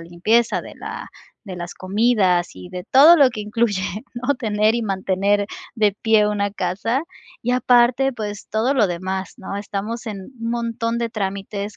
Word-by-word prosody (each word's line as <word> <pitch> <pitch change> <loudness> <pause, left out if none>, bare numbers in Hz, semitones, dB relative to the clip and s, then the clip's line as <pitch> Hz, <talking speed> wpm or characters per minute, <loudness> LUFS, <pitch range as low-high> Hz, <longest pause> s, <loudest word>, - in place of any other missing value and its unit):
limpieza, 180 +8 +1
de - - -11
la - - -7 0.4
de 185 -2 -6
las 175 0 -6
comidas 190 -3 +2
y 180 - -10
de 180 -1 -6
todo 300 +6 +8
lo 280 -5 +6
que 230 -3 -6
incluye, 210 -2 0 0.3
¿no?, 250 +4 0
tener 215 -2 +1
y 235 - 0
mantener 195 0 0 0.3
de 210 -4 +2
pie 220 -2 +4
una 205 -1 0
casa, 200 +7 -1 0.4
y 245 - 0
aparte, 250 +2 +3
pues, 210 -3 -6
todo 225 +5 +1
lo 235 -6 +4
demás, 185 +2 -4
¿no?, 195 -1 -6
estamos 210 +4 -5
en 200 -3 -5 0.2
un 230 0 -2
montón 230 -1 -2
de 235 -1 -1
trámites 200 -1 -4
210 Hz, 170 wpm, -21 LUFS, 195-235 Hz, 0.4 s, todo